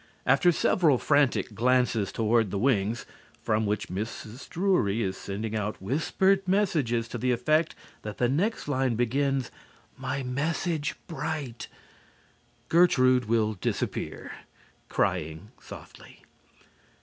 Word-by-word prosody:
After 175 - +4
several 160 -3 +3
frantic 145 -5 +2
glances 120 -2 +2
toward 115 -1 +2
the 100 - -3
wings, 110 -1 +1 0.3
from 110 0 0
which 105 0 -1
Mrs. 110 +5 -6
Drury 165 - +1
is 95 0 -2
sending 105 +3 -5
out 105 0 -3
whispered 165 - +1
messages 155 - +1
to 120 - -5
the 125 +2 +1
effect 155 +7 +1 0.3
that 105 -1 -7
the 125 - +2
next 175 - -1
line 130 -4 +1
begins, 135 +3 0 0.4
"My 140 - -3
message 150 +4 -1
bright 150 -8 -5 0.5
" - - -36
Gertrude 130 -8 +4
will 110 -1 +1
disappear, 95 - -3 0.6
crying 85 +4 -1
softly. - - -13
125 Hz, 115 wpm, -27 LUFS, 110-150 Hz, 0.6 s, After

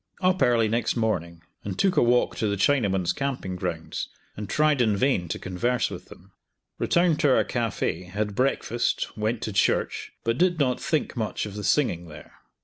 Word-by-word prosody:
Up 185 0 +2
early 115 -2 +4
next 115 +2 0
morning 85 -8 -2 0.2
and 100 -2 -5
took 190 -2 +2
a - - +4
walk 120 +1 +3
to 110 - 0
the 100 - 0
Chinamen's 95 -5 +2
camping 130 -9 -3
grounds, 90 -3 -4 0.3
and 105 -1 -6
tried 150 -3 +3
in 110 -4 +2
vain 125 -8 +1
to - - -3
converse 110 +7 -1
with - - -8
them. - - -16 0.5
Returned 170 -2 +2
to 140 -3 +4
our - - +4
cafe, 115 -7 -2
had 105 +3 -3
breakfast, 120 -1 0
went 110 +2 -2
to 110 - -3
church, 100 - 0
but 115 +2 0
did 180 -1 +3
not 130 -3 +1
think 160 -6 -1
much 110 -3 -2
of 105 - -7
the 105 0 -6
singing 90 - +1
there. 75 -1 -12
110 Hz, 185 wpm, -25 LUFS, 95-135 Hz, 0.5 s, early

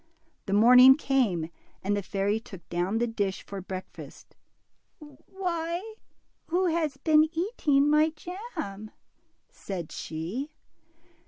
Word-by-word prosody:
The 195 - -1
morning 250 +5 +8
came, 230 - 0 0.3
and 205 +2 0
the 205 - -1
fairy 200 +3 -1
took 190 -6 -13
down 175 +5 -1
the 240 - +1
dish 205 -4 -2
for 200 -1 -7
breakfast. 185 0 -9 0.6
Why, 340 +5 -5 0.5
who 360 +3 +1
has 320 -5 0
been 310 +2 +4
eating 320 - +1
my 305 +1 +4
jam?" 315 - -7 0.6
said 180 -5 -7
she. 190 - -5
265 Hz, 110 wpm, -27 LUFS, 195-320 Hz, 0.6 s, morning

